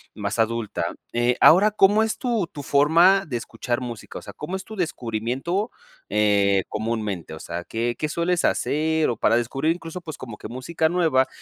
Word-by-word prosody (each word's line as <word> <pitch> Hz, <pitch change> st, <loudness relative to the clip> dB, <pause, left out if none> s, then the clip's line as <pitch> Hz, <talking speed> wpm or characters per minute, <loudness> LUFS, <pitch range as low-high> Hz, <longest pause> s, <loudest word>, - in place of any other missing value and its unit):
más 105 Hz, +1 st, -3 dB
adulta. 115 Hz, -1 st, -1 dB, 0.3 s
Eh, 120 Hz, +1 st, +1 dB
ahora, 200 Hz, +6 st, +7 dB
¿cómo 210 Hz, +1 st, +4 dB
es 220 Hz, -, -2 dB
tu 230 Hz, -8 st, -1 dB
tu 145 Hz, -3 st, -9 dB
forma 165 Hz, +8 st, +4 dB
de 135 Hz, -, -5 dB
escuchar 120 Hz, +1 st, -3 dB
música?, 120 Hz, -3 st, -7 dB
o -, -, -14 dB
sea, 100 Hz, -, -9 dB
¿cómo 160 Hz, -, -6 dB
es 190 Hz, -, -5 dB
tu 220 Hz, -, -10 dB
descubrimiento, 135 Hz, -, -2 dB, 0.4 s
eh, 100 Hz, -2 st, +3 dB
comúnmente?, 105 Hz, -6 st, -3 dB
o 80 Hz, -, -8 dB
sea, 85 Hz, +1 st, -6 dB
¿qué 120 Hz, +1 st, -2 dB
qué 155 Hz, -, 0 dB
sueles 170 Hz, +3 st, 0 dB
hacer?, 160 Hz, +1 st, +1 dB
o 115 Hz, -, -2 dB
para 115 Hz, -, +3 dB
descubrir 135 Hz, +7 st, 0 dB
incluso, 165 Hz, 0 st, -7 dB
pues, 160 Hz, -4 st, -8 dB
como 115 Hz, -5 st, -8 dB
que -, -, -8 dB
música 160 Hz, +6 st, -1 dB
nueva, 160 Hz, -7 st, +2 dB
135 Hz, 185 wpm, -23 LUFS, 115-170 Hz, 0.4 s, ahora